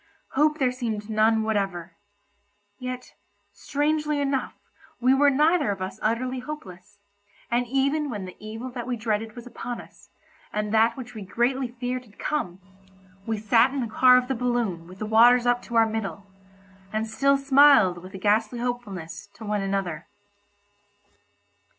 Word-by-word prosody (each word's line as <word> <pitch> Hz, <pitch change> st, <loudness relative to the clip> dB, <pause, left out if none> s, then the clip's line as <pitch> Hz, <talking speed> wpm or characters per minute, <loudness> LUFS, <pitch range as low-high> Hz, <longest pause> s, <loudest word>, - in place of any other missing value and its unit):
Hope 300 Hz, +2 st, +2 dB
there 260 Hz, -4 st, +2 dB
seemed 225 Hz, -4 st, -4 dB
none 220 Hz, +1 st, +3 dB
whatever—yet, 205 Hz, +4 st, -6 dB, 0.4 s
strangely 300 Hz, +1 st, -1 dB
enough 275 Hz, -2 st, -1 dB, 0.4 s
we 255 Hz, +2 st, +4 dB
were 285 Hz, +2 st, +5 dB
neither 300 Hz, +2 st, +3 dB
of 200 Hz, -1 st, -2 dB
us 185 Hz, 0 st, -5 dB
utterly 250 Hz, +4 st, -1 dB
hopeless, 205 Hz, -9 st, -9 dB, 0.5 s
and 240 Hz, +1 st, +1 dB
even 280 Hz, +4 st, +1 dB
when 205 Hz, -6 st, -5 dB
the 185 Hz, -, -10 dB
evil 225 Hz, +4 st, -7 dB
that 245 Hz, -1 st, -6 dB
we 245 Hz, -1 st, -2 dB
dreaded 220 Hz, -1 st, -2 dB
was 240 Hz, -1 st, -9 dB
upon 245 Hz, 0 st, -6 dB
us, -, -, -15 dB, 0.4 s
and 210 Hz, 0 st, -2 dB
that 225 Hz, +2 st, +3 dB
which 245 Hz, -2 st, -8 dB
we 220 Hz, -, -8 dB
greatly 245 Hz, +7 st, 0 dB
feared 250 Hz, +1 st, -4 dB
had 210 Hz, -3 st, -22 dB
come, 190 Hz, -12 st, -3 dB, 0.7 s
we 225 Hz, -1 st, -1 dB
sat 225 Hz, +4 st, +4 dB
in -, -, -1 dB
the 240 Hz, -, -1 dB
car 250 Hz, +3 st, +6 dB
of 250 Hz, 0 st, 0 dB
the 265 Hz, -, 0 dB
balloon 235 Hz, -9 st, -1 dB
with 185 Hz, +1 st, -12 dB
the 215 Hz, -, -4 dB
waters 235 Hz, +3 st, +5 dB
up 245 Hz, 0 st, +2 dB
to 235 Hz, -, -8 dB
our 225 Hz, 0 st, +6 dB
middle, 215 Hz, -3 st, -4 dB, 0.7 s
and 220 Hz, +1 st, -1 dB
still 275 Hz, +5 st, +2 dB
smiled 275 Hz, -9 st, +5 dB
with 185 Hz, +2 st, -11 dB
a -, -, -4 dB
ghastly 215 Hz, +4 st, +1 dB
hopefulness 235 Hz, -9 st, -5 dB
to 220 Hz, -, -10 dB
one 210 Hz, -1 st, -1 dB
another. 195 Hz, -5 st, -3 dB
235 Hz, 160 wpm, -25 LUFS, 205-255 Hz, 0.7 s, car